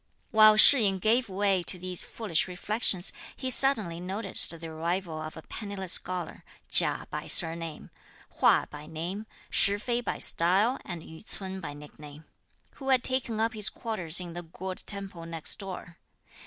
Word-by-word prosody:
While 215 -2 +5
Shih 270 +5 +7
yin 195 -3 +1
gave 225 +4 0
way 195 -1 -1
to 180 - -2
these 180 0 -3
foolish 200 -8 -3
reflections, 190 0 +1 0.2
he 260 -1 -2
suddenly 220 -12 +7
noticed 195 +3 -1
the 165 - -9
arrival 165 +1 -5
of 155 0 -9
a 160 - -11
penniless 200 -4 -2
scholar, 180 -2 -2 0.3
Chia - - +6
by - - -7
surname, 165 -1 +1 0.5
Hua - - +3
by 150 0 -11
name, 175 +7 -7 0.2
Shih 200 +1 +3
fei 240 +3 -3
by - - -5
style 195 +9 +1
and 175 -4 -9
Yü 160 0 -14
ts'un 190 -3 -8
by 145 -4 -8
nickname, 150 +1 -14 0.5
who 270 -1 -7
had 255 -2 +2
taken 250 -4 -1
up 225 +1 -1
his 210 -3 +3
quarters 185 -6 -3
in 175 -2 -8
the 175 - -7
Gourd 185 +3 -7
temple 195 -5 -6
next 165 -2 -1
door. 185 -3 -10
190 Hz, 165 wpm, -26 LUFS, 165-215 Hz, 0.5 s, Shih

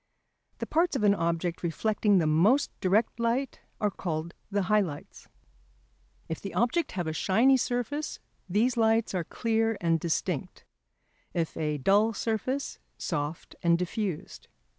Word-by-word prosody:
The - - -3
parts 335 -1 +1
of 260 - 0
an 205 -1 +6
object 170 -1 -1
reflecting 205 +4 +1
the 170 - +3
most 190 - +3
direct 210 +5 +1
light 235 +4 0 0.2
are 210 -1 +1
called 170 -3 -4 0.2
the 200 -1 0
high 210 +3 +3
lights. 155 -7 -7 1.0
If 160 - -4
the 195 - -6
object 260 +8 +1
have 180 -2 -2
a 160 - -2
shiny 230 - +4
surface 250 +4 -2 0.3
these 225 +7 +2
lights 225 -1 +2
are 180 -2 0
clear 225 +3 0
and 165 -1 +2
distinct; 170 +1 -2 0.7
if 165 -2 -1
a 150 -1 -1
dull 205 +10 +3
surface, 245 +7 -2 0.2
soft 145 +3 -4
and 170 0 +4
diffused. 180 -1 -4
200 Hz, 140 wpm, -28 LUFS, 170-230 Hz, 1.0 s, an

